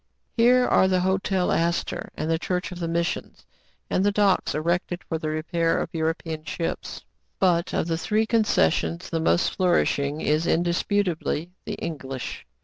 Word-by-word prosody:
Here 250 +2 +5
are 190 - +4
the 185 -1 +2
Hotel 190 0 +1
Astor, 170 +1 -1
and - - -3
the 165 0 +1
Church 180 +1 -2
of 180 - -7
the 170 - -2
Missions, 170 +1 -2 0.4
and 185 - +1
the 205 - +3
docks 200 -5 +2
erected 175 +3 -1
for 160 - -3
the 155 - -3
repair 165 +2 0
of - - -3
European 160 -1 -2
ships. 165 +1 -4 0.2
' - - -47
But, 175 -1 +2
of. - - 0
the 165 -1 -1
three 215 +5 +1
concessions, 85 - +1
the 165 - 0
most 165 +2 +2
flourish 180 -5 +2
ing 140 +2 -2
is 155 +2 +1
indisputably 175 -1 0
the - - -3
English. 135 -5 -6
170 Hz, 165 wpm, -25 LUFS, 160-185 Hz, 0.4 s, Here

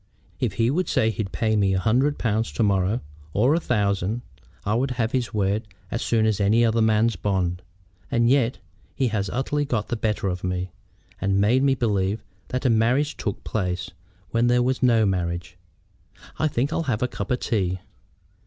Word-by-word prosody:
If - - 0
he 115 +1 +2
would 180 +5 0
say 110 0 +2
he'd 100 -1 -4
pay 110 -1 0
me 100 -2 +2
a - - +1
hundred 130 +9 +2
pounds 110 -1 0
to 115 - +1
morrow, 100 +3 +1 0.3
or 125 +8 +3
a 165 - +2
thousand, 105 - 0 0.4
I 105 - +1
would 130 +4 +1
have 120 -2 -1
his 125 -3 -1
word 105 +1 0 0.2
as - - -2
soon 110 -2 +2
as 105 -2 +1
any 110 +4 +4
other 115 0 +2
man's 110 +1 +3
bond. 90 -3 -1 0.5
And 120 -2 +2
yet 130 -1 +3 0.4
he 130 -3 +1
has 100 -3 -1
utterly 140 +5 -1
got 120 -7 -2
the - - 0
better 105 -3 -1
of 90 -1 -3
me, 90 0 -2 0.5
and 95 0 +2
made 115 +6 +3
me 135 -1 +3
believe 105 -3 0 0.2
that 125 +2 -3
a - - +5
marriage 125 +6 +2
took 100 - -4
place, 90 -4 -2 0.4
when 115 +1 +2
there 120 0 +3
was 130 +1 0
no 115 -4 +4
marriage. 90 -2 -2 0.8
I 155 - +3
think 140 +1 -1
I'll - - 0
have 115 -1 0
a - - +2
cup 100 -5 -5
of 125 - +1
tea." 95 -5 0
110 Hz, 190 wpm, -24 LUFS, 100-125 Hz, 0.8 s, a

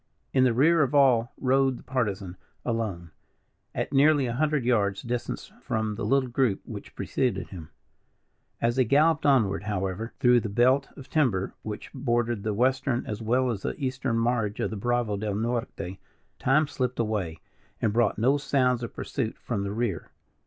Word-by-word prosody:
In 130 -1 +4
the 125 - +3
rear 160 +6 +4
of 140 0 +1
all 125 -4 +4
rode 135 -1 +2
the - - -14
Partisan, 105 -8 -2 0.3
alone, 105 -8 -3 0.6
at - - -2
nearly 145 0 +5
a 120 - -2
hundred 150 -1 0
yards 100 -5 +1
distance 120 0 -4
from 110 -1 -1
the 105 - -5
little 135 -1 +2
group 125 -4 +1
which - - -9
preceded 105 -8 -1
him. 85 -5 -9 0.9
As 120 +2 +1
they 130 - +5
galloped 150 +5 +3
onward, 105 -9 +2
however, 100 +2 -2
through 125 -1 +5
the 110 - -4
belt 130 +6 +3
of 135 - -10
timber 115 -12 +1
which 105 -1 -7
bordered 120 -4 0
the 105 0 -2
Western 130 +1 +1
as 105 +1 -5
well 125 +3 +1
as 100 -4 -4
the - - -3
Eastern 130 -3 -1
marge 115 -3 0
of - - -1
the - - -4
Bravo 120 0 0
del 105 0 -2
Norte, 115 -4 -3 0.4
time 150 +4 +3
slipped 125 -3 -3
away 105 -8 -1 0.4
and 105 - +1
brought 115 -3 +2
no 130 +6 +3
sounds 130 -4 +1
of 115 - -6
pursuit 110 - -3
from 115 -5 -3
the 100 0 -3
rear. 105 -6 -2
120 Hz, 175 wpm, -27 LUFS, 105-130 Hz, 0.9 s, nearly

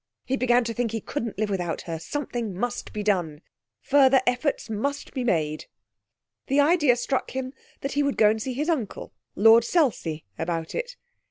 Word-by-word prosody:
He 265 - 0
began 245 -1 +3
to 230 0 -3
think 240 +1 -1
he 225 - -1
couldn't 230 0 -4
live 210 0 -1
without 175 -4 -2
her. 165 -2 -5
Something 235 - -4
must 245 +4 -3
be 210 - -4
done. 175 -8 0 0.4
Further 270 -1 +5
efforts 250 +4 0
must 280 +7 -3
be 260 - -2
made. 155 -9 -1 0.8
The 275 +2 +2
idea 295 -4 +4
struck 260 +2 -2
him 260 0 -3 0.3
that 275 - -3
he 290 - +1
would 280 -1 0
go 210 -1 +6
and 220 0 -3
see 260 +3 -3
his 295 +5 -2
uncle, 275 - -2 0.2
Lord 225 +3 +7
Selsey, 230 - 0 0.2
about 165 -1 -3
it. - - -4
240 Hz, 180 wpm, -25 LUFS, 205-275 Hz, 0.8 s, Lord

